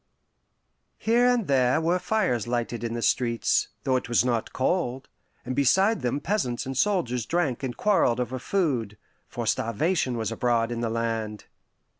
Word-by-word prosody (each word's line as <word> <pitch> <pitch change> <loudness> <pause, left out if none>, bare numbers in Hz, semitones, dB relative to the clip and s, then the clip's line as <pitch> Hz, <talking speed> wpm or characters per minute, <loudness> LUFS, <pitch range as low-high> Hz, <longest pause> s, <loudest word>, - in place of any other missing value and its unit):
Here 235 +2 +3
and 245 -4 +2
there 130 0 +3
were 170 +3 +1
fires 180 - 0
lighted 120 -1 -2
in 115 0 -3
the 120 - -3
streets, 115 -2 +1 0.2
though 130 -1 +2
it 125 - -5
was 120 +1 +3
not 120 -3 -1
cold, 130 -3 -1 0.4
and 130 +1 -3
beside 190 - +3
them 125 +3 -1
peasants 145 - -1
and 135 0 -4
soldiers 125 - 0
drank 165 -8 0
and 130 -3 -4
quarreled 165 - +2
over 125 +1 -2
food 125 - -1 0.3
for 120 - -5
starvation 120 - 0
was 110 -1 -2
abroad 115 0 +1
in 120 0 -3
the 115 - -1
land. 115 -2 -3
125 Hz, 160 wpm, -26 LUFS, 115-170 Hz, 0.4 s, Here